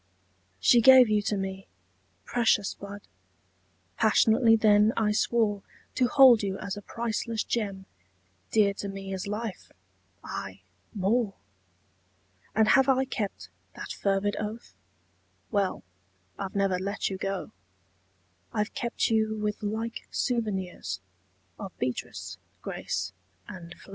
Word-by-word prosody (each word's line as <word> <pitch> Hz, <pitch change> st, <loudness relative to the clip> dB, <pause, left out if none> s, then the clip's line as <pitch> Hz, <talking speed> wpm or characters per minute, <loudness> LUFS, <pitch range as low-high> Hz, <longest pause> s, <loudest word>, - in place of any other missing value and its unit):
She 235 Hz, -, +5 dB
gave 255 Hz, -1 st, +8 dB
you 210 Hz, -1 st, +3 dB
to 205 Hz, 0 st, -1 dB
me. 195 Hz, 0 st, -5 dB, 0.6 s
Precious 225 Hz, -4 st, +2 dB
bud! 200 Hz, 0 st, -9 dB, 1.0 s
Passionately 225 Hz, +1 st, +5 dB
then 215 Hz, 0 st, +4 dB
I 215 Hz, -2 st, +2 dB
swore 210 Hz, -1 st, +1 dB, 0.3 s
To 255 Hz, -, +2 dB
hold 250 Hz, -3 st, +7 dB
you 195 Hz, -1 st, -2 dB
as 200 Hz, -1 st, -5 dB
a 205 Hz, -, -7 dB
priceless 230 Hz, 0 st, -3 dB
gem, 200 Hz, -4 st, -3 dB, 0.6 s
Dear 205 Hz, -2 st, +3 dB
to 200 Hz, -, -5 dB
me 195 Hz, 0 st, -6 dB
as 190 Hz, +1 st, -4 dB
life 210 Hz, -1 st, -5 dB, 0.5 s
aye 95 Hz, 0 st, -6 dB, 0.3 s
more! 205 Hz, +1 st, 0 dB, 1.2 s
And 220 Hz, 0 st, +4 dB
have 270 Hz, 0 st, +5 dB
I 265 Hz, 0 st, +3 dB
kept 215 Hz, -6 st, -5 dB, 0.2 s
that -, -, -7 dB
fervid 200 Hz, +1 st, 0 dB
oath? 215 Hz, +2 st, -6 dB, 0.8 s
Well 200 Hz, -3 st, 0 dB, 0.5 s
I've 195 Hz, -1 st, -6 dB
never 195 Hz, -2 st, +1 dB
let 200 Hz, +1 st, -2 dB
you 190 Hz, -, -5 dB
go: 195 Hz, -1 st, -3 dB, 1.0 s
I've 210 Hz, -1 st, -2 dB
kept 235 Hz, -1 st, -1 dB
you 220 Hz, -1 st, +2 dB
with 210 Hz, 0 st, -2 dB
like 220 Hz, +2 st, -4 dB
souvenirs 190 Hz, -, -2 dB, 0.6 s
Of 195 Hz, -3 st, -8 dB
Beatrice, 125 Hz, -1 st, -4 dB, 0.2 s
Grace 95 Hz, 0 st, -3 dB, 0.3 s
and 175 Hz, -2 st, -9 dB
Flo. -, -, -17 dB
210 Hz, 125 wpm, -28 LUFS, 195-225 Hz, 1.2 s, gave